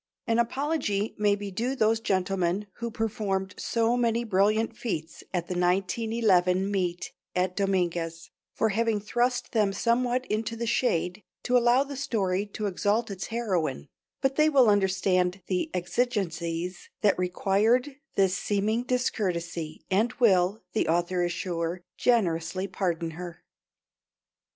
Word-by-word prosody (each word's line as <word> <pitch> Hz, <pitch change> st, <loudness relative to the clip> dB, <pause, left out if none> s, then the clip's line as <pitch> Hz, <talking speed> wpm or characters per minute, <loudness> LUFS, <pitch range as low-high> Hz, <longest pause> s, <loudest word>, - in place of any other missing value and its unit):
An 230 Hz, 0 st, +1 dB
apology 235 Hz, -4 st, 0 dB
may 205 Hz, -1 st, +3 dB
be 205 Hz, -1 st, -6 dB
due 240 Hz, +8 st, -1 dB
those 220 Hz, -2 st, +2 dB
gentlemen 190 Hz, -1 st, 0 dB
who 235 Hz, 0 st, -3 dB
performed 205 Hz, -4 st, -2 dB
so 230 Hz, +1 st, +1 dB
many 235 Hz, -1 st, +1 dB
brilliant 215 Hz, +2 st, +2 dB
feats 165 Hz, -10 st, -4 dB
at 175 Hz, -2 st, -1 dB
the -, -, -3 dB
1911 190 Hz, +1 st, +2 dB
meet 180 Hz, -3 st, -2 dB, 0.2 s
at 180 Hz, 0 st, 0 dB
Dominguez, 175 Hz, -4 st, -1 dB, 0.2 s
for 220 Hz, -, +1 dB
having 220 Hz, +1 st, +1 dB
thrust 245 Hz, +4 st, 0 dB
them 210 Hz, -4 st, +2 dB
somewhat 245 Hz, +4 st, +1 dB
into 220 Hz, +1 st, -2 dB
the 235 Hz, +1 st, -3 dB
shade 195 Hz, -5 st, 0 dB, 0.2 s
to 250 Hz, -, +1 dB
allow 245 Hz, +2 st, +5 dB
the 280 Hz, 0 st, -7 dB
story 205 Hz, -7 st, -1 dB
to 210 Hz, +1 st, -5 dB
exalt 205 Hz, +3 st, 0 dB
its 190 Hz, -1 st, -5 dB
heroine; 185 Hz, -, -2 dB, 0.3 s
but 270 Hz, 0 st, +1 dB
they 305 Hz, 0 st, +5 dB
will 265 Hz, -6 st, +5 dB
understand 190 Hz, -2 st, +1 dB
the 180 Hz, -1 st, -1 dB
exigencies 175 Hz, -4 st, -2 dB
that 200 Hz, -4 st, +3 dB
required 215 Hz, +9 st, +1 dB, 0.2 s
this 190 Hz, -1 st, +3 dB
seeming 210 Hz, +4 st, 0 dB
discourtesy 175 Hz, -10 st, -2 dB
and 220 Hz, +5 st, +2 dB
will, 195 Hz, -4 st, +3 dB
the -, -, +1 dB
author 175 Hz, +2 st, +1 dB
is 175 Hz, -, 0 dB
sure, 175 Hz, 0 st, -3 dB
generously 185 Hz, -6 st, +1 dB
pardon 175 Hz, -3 st, -2 dB
her. 175 Hz, +1 st, -8 dB
200 Hz, 135 wpm, -27 LUFS, 180-230 Hz, 0.3 s, allow